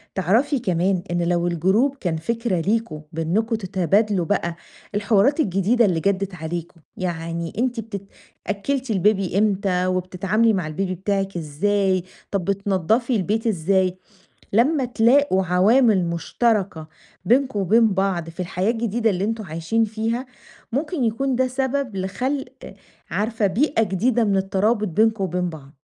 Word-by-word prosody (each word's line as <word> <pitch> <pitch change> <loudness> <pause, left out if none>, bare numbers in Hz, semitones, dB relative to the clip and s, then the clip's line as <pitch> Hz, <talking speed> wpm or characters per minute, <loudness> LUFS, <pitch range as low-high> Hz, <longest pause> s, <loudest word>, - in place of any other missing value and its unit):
تعرفي 230 - +2
كمان، 185 -3 0
إن 175 - 0
لو 175 0 +1
الجروب 190 - +2
كان 175 -11 -2
فكرة 230 +2 -1
ليكم 205 -5 -1
بأنكم 185 +9 0
تتبادلوا 195 -1 +1
بقى 170 -3 -1 0.4
الحوارات 210 +7 +3
الجديدة 210 - +2
اللي 175 -4 +1
جدّت 195 +1 -1
عليكم، 165 +1 -6 0.2
يعني 170 -2 -3
أنتِ 245 0 0
بتت 200 -3 -6 0.4
أكلّتِ 250 +5 -2
الBaby 195 -1 +1
إمتى؟ 195 -3 +1
وبتتعاملي 185 +5 +1
مع 185 -6 -1
البيبي 185 +4 -2
بتاعِك 195 0 -2
إزاي؟ 185 +4 0 0.3
طب 195 -4 -1
بتنضفي 200 +5 +1
البيت 215 +3 0
إزاي؟ 185 -1 +1 0.6
لمّا 265 +7 +3
تلاقوا 245 -3 +3
عوامل 195 +3 +4
مشتركة 175 0 -1 0.4
بينكم 245 0 +2
وبين 220 +5 +4
بعض 190 -4 0
في 165 - -10
الحياة 185 +3 -1
الجديدة، 230 -1 0
اللي 190 +1 -1
أنتم 225 0 -2
عايشين 165 +7 0
فيها 225 +4 -2 0.5
مُمكن 300 +1 -1
يكون 245 +3 0
ده 260 - +2
سبب 265 -3 -2
لخلق 250 +9 -4 0.4
عارفة، 220 0 0
بيئة 230 +5 +1
جديدة 225 +4 +1
من 200 -2 +1
الترابط 200 +3 +1
بينكم 220 +3 +2
وبين 180 0 -1
بعض 145 -3 -12
200 Hz, 135 wpm, -22 LUFS, 180-230 Hz, 0.6 s, عوامل